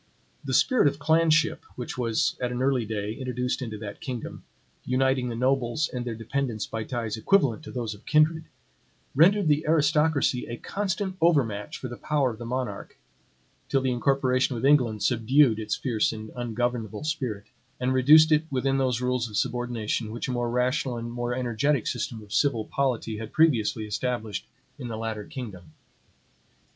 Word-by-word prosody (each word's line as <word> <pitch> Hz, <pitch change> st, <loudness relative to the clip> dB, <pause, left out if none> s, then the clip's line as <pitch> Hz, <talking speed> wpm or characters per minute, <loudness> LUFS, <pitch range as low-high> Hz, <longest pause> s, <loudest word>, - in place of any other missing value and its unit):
The -, -, -1 dB
spirit 255 Hz, -, +4 dB
of 140 Hz, -, 0 dB
clanship 160 Hz, +1 st, +3 dB, 0.2 s
which 125 Hz, -, -5 dB
was, 115 Hz, -3 st, 0 dB
at 125 Hz, -1 st, -1 dB
an 125 Hz, +1 st, -2 dB
early 130 Hz, -3 st, +1 dB
day, 105 Hz, -1 st, -3 dB
introduced 125 Hz, 0 st, -3 dB
into 110 Hz, -4 st, -5 dB
that 105 Hz, -1 st, -8 dB
kingdom, 125 Hz, -4 st, -6 dB, 0.4 s
uniting 130 Hz, 0 st, +1 dB
the 115 Hz, -, -4 dB
nobles 130 Hz, +3 st, +1 dB
and 125 Hz, -1 st, -4 dB
their 120 Hz, -2 st, -4 dB
dependants 115 Hz, -1 st, -2 dB
by 110 Hz, -1 st, -5 dB
ties 115 Hz, -3 st, -3 dB
equivalent 140 Hz, -, +2 dB
to -, -, -8 dB
those 115 Hz, -3 st, -3 dB
of 105 Hz, -, -16 dB
kindred, 155 Hz, +1 st, +3 dB, 0.7 s
rendered 190 Hz, +5 st, +5 dB
the 150 Hz, +1 st, +3 dB
aristocracy 150 Hz, -4 st, +2 dB
a 120 Hz, -, -5 dB
constant 195 Hz, -, -3 dB
overmatch 125 Hz, -12 st, +1 dB
for 130 Hz, -, -6 dB
the 120 Hz, 0 st, -8 dB
power 145 Hz, -4 st, 0 dB
of 110 Hz, -, -10 dB
the 120 Hz, -, -6 dB
monarch, 130 Hz, +1 st, -4 dB, 0.7 s
till 135 Hz, -, +3 dB
the 130 Hz, -1 st, 0 dB
incorporation 130 Hz, 0 st, +1 dB
with 115 Hz, -, -2 dB
England 125 Hz, -7 st, +3 dB
subdued 120 Hz, 0 st, +3 dB
its 110 Hz, -1 st, -2 dB
fierce 115 Hz, -5 st, 0 dB
and 110 Hz, -1 st, -8 dB
ungovernable 120 Hz, -1 st, -2 dB
spirit, 130 Hz, -10 st, -3 dB, 0.4 s
and 130 Hz, +1 st, 0 dB
reduced 155 Hz, +5 st, +7 dB
it 155 Hz, +1 st, +4 dB
within 135 Hz, 0 st, 0 dB
those 125 Hz, -2 st, 0 dB
rules 125 Hz, -2 st, 0 dB
of 105 Hz, -, -4 dB
subordination 115 Hz, -1 st, -2 dB
which 120 Hz, -, -4 dB
a -, -, -2 dB
more 120 Hz, -1 st, -1 dB
rational 125 Hz, +1 st, 0 dB
and 115 Hz, 0 st, -5 dB
more 120 Hz, 0 st, -2 dB
energetic 125 Hz, +2 st, 0 dB
system 110 Hz, -2 st, -3 dB
of 105 Hz, -, -11 dB
civil 120 Hz, -7 st, +2 dB
polity 125 Hz, -5 st, -1 dB
had 110 Hz, 0 st, -7 dB
previously 115 Hz, -9 st, +2 dB
established 110 Hz, 0 st, -3 dB, 0.3 s
in 125 Hz, -, -5 dB
the 115 Hz, -2 st, -5 dB
latter 110 Hz, -2 st, -4 dB
kingdom. 100 Hz, -, -8 dB
125 Hz, 170 wpm, -26 LUFS, 115-140 Hz, 0.7 s, reduced